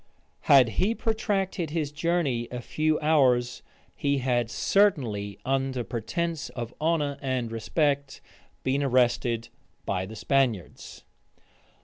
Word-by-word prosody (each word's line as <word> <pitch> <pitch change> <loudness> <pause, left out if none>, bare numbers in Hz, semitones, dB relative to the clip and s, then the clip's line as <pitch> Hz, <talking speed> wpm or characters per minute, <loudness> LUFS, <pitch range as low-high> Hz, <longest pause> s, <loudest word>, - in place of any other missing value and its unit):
Had 130 -4 +7
he 215 +5 +2
protracted 195 -7 -1
his 150 -2 -2
journey 150 -6 0
a 125 - -5
few 155 +5 0
hours, 130 -6 +2 0.3
he 140 0 0
had 120 -3 0
certainly, 115 - +1
under 135 -1 0
pretence 155 +8 -3
of 120 -1 -5
honor 150 -3 0
and 130 -4 -2
respect, 140 +4 -1 0.4
been 135 +2 +1
arrested 120 -3 +1 0.4
by 95 -1 -2
the 110 - -9
Spaniards. 120 - -1
135 Hz, 110 wpm, -27 LUFS, 120-155 Hz, 0.4 s, Had